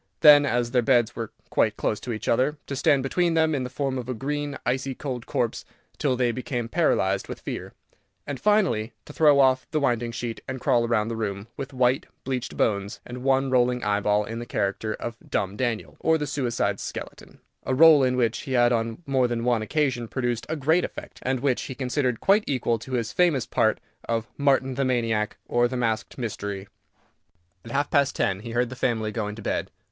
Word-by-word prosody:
Then, 145 Hz, -1 st, +8 dB
as 120 Hz, -1 st, 0 dB
their 125 Hz, -1 st, +3 dB
beds 120 Hz, -1 st, +2 dB
were 115 Hz, -2 st, -5 dB, 0.2 s
quite -, -, +2 dB
close 105 Hz, -, -1 dB
to 125 Hz, -, -5 dB
each 110 Hz, -, -5 dB
other, 130 Hz, +6 st, +2 dB
to 140 Hz, -, -4 dB
stand 135 Hz, 0 st, +3 dB
between 170 Hz, +5 st, +1 dB
them 160 Hz, -1 st, +3 dB
in 135 Hz, -3 st, -1 dB
the 125 Hz, -, -4 dB
form 135 Hz, 0 st, -2 dB
of 125 Hz, 0 st, -7 dB
a 130 Hz, -, -2 dB
green, 145 Hz, +3 st, -3 dB
icy 130 Hz, +1 st, -1 dB
cold 125 Hz, -4 st, -5 dB
corpse, 120 Hz, -2 st, -1 dB, 0.4 s
till 135 Hz, -4 st, +1 dB
they 125 Hz, -1 st, +1 dB
became 120 Hz, -1 st, -3 dB
paralyzed 115 Hz, -, +1 dB
with -, -, -7 dB
fear, -, -, -6 dB, 0.5 s
and 140 Hz, -3 st, -5 dB
finally, 185 Hz, -, +2 dB
to -, -, -11 dB
throw 150 Hz, -3 st, +5 dB
off 130 Hz, -1 st, +3 dB
the 155 Hz, -, 0 dB
winding 120 Hz, -4 st, 0 dB
sheet, 115 Hz, 0 st, -5 dB
and 130 Hz, 0 st, -4 dB
crawl 120 Hz, -3 st, +2 dB
round 115 Hz, -1 st, +1 dB
the -, -, -2 dB
room, 100 Hz, -1 st, -4 dB
with 135 Hz, +1 st, -6 dB
white, 130 Hz, 0 st, +1 dB, 0.2 s
bleached 130 Hz, -2 st, -4 dB
bones 100 Hz, 0 st, 0 dB
and 125 Hz, +1 st, -7 dB
one 135 Hz, 0 st, +2 dB
rolling 125 Hz, -1 st, +2 dB
eyeball, 105 Hz, 0 st, +2 dB
in 115 Hz, +2 st, -5 dB
the 120 Hz, -, -5 dB
character 100 Hz, +2 st, -1 dB
of 120 Hz, 0 st, -6 dB
"Dumb 95 Hz, +1 st, -1 dB
Daniel, 120 Hz, -2 st, -2 dB
or 160 Hz, 0 st, +3 dB
the 150 Hz, -, -2 dB
Suicide's 120 Hz, -8 st, -1 dB
Skeleton," -, -, -8 dB, 0.2 s
a -, -, -1 dB
rôle 155 Hz, -1 st, +7 dB
in 125 Hz, -1 st, +1 dB
which 115 Hz, -2 st, +1 dB
he 135 Hz, -, -5 dB
had 120 Hz, -1 st, +4 dB
on 115 Hz, +5 st, -1 dB
more 130 Hz, -2 st, +2 dB
than 120 Hz, -1 st, -2 dB
one 120 Hz, -2 st, +2 dB
occasion 130 Hz, -1 st, 0 dB
produced 120 Hz, -2 st, -2 dB
a 160 Hz, -, -1 dB
great 160 Hz, +4 st, +2 dB
effect, -, -, -7 dB
and 130 Hz, -1 st, -1 dB
which 135 Hz, -3 st, +1 dB
he 130 Hz, -, -6 dB
considered 125 Hz, -2 st, -1 dB
quite 205 Hz, +2 st, +4 dB
equal 120 Hz, -4 st, 0 dB
to 130 Hz, +4 st, -9 dB
his 120 Hz, -2 st, -1 dB
famous 170 Hz, -8 st, +2 dB
part 110 Hz, -1 st, +1 dB, 0.3 s
of 115 Hz, -1 st, 0 dB
"Martin 135 Hz, -2 st, +2 dB
the 135 Hz, +2 st, -1 dB
Maniac, 115 Hz, -4 st, 0 dB
or 120 Hz, 0 st, +3 dB
the 130 Hz, +1 st, -4 dB
Masked 115 Hz, -2 st, -1 dB
Mystery." 100 Hz, -4 st, -4 dB, 1.0 s
At -, -, -10 dB
half 140 Hz, +3 st, -1 dB
past 140 Hz, -3 st, +3 dB
ten 95 Hz, -1 st, 0 dB
he 115 Hz, +3 st, -8 dB
heard 120 Hz, +1 st, 0 dB
the -, -, -6 dB
family 110 Hz, -4 st, -1 dB
going 105 Hz, -1 st, -3 dB
to 110 Hz, -, -10 dB
bed. -, -, -2 dB
125 Hz, 210 wpm, -25 LUFS, 115-135 Hz, 1.0 s, Then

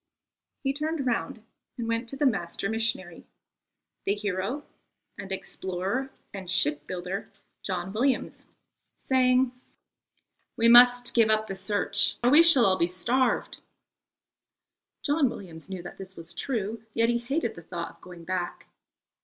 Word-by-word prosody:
He 270 Hz, 0 st, 0 dB
turned 305 Hz, 0 st, -3 dB
round 235 Hz, -2 st, -2 dB, 0.3 s
and 235 Hz, -2 st, -4 dB
went 230 Hz, +1 st, -2 dB
to 275 Hz, -, -5 dB
the 290 Hz, -, +1 dB
master 195 Hz, -6 st, -1 dB
missionary 220 Hz, -6 st, -2 dB, 0.8 s
the 200 Hz, -, 0 dB
hero 205 Hz, +7 st, -3 dB, 0.5 s
and 195 Hz, -1 st, -9 dB
explorer 190 Hz, +7 st, -3 dB, 0.2 s
and 190 Hz, -3 st, -7 dB
shipbuilder, 180 Hz, +3 st, -1 dB, 0.3 s
John 185 Hz, 0 st, -3 dB
Williams, 255 Hz, +5 st, -1 dB, 0.5 s
saying: 255 Hz, -1 st, +2 dB, 1.1 s
"We 230 Hz, -1 st, +4 dB
must 245 Hz, 0 st, +7 dB
give 230 Hz, -2 st, +4 dB
up 215 Hz, 0 st, +2 dB
the 195 Hz, -, -6 dB
search 200 Hz, +1 st, +1 dB
or 245 Hz, -, +4 dB
we 300 Hz, +4 st, +8 dB
shall 330 Hz, -8 st, +7 dB
all 190 Hz, -1 st, +3 dB
be 170 Hz, -, +3 dB
starved." 235 Hz, +9 st, 0 dB, 1.4 s
John 290 Hz, -2 st, +2 dB
Williams 170 Hz, -6 st, -9 dB
knew 185 Hz, -2 st, -6 dB
that 175 Hz, -, -10 dB
this 190 Hz, -1 st, -9 dB
was 165 Hz, -, -7 dB
true; 225 Hz, -3 st, -3 dB
yet 230 Hz, 0 st, +3 dB
he 235 Hz, 0 st, +1 dB
hated 250 Hz, +1 st, -2 dB
the 170 Hz, -, -11 dB
thought 170 Hz, 0 st, -6 dB
of -, -, -34 dB
going 175 Hz, -2 st, -12 dB
back. 180 Hz, 0 st, -4 dB
215 Hz, 140 wpm, -27 LUFS, 185-250 Hz, 1.4 s, we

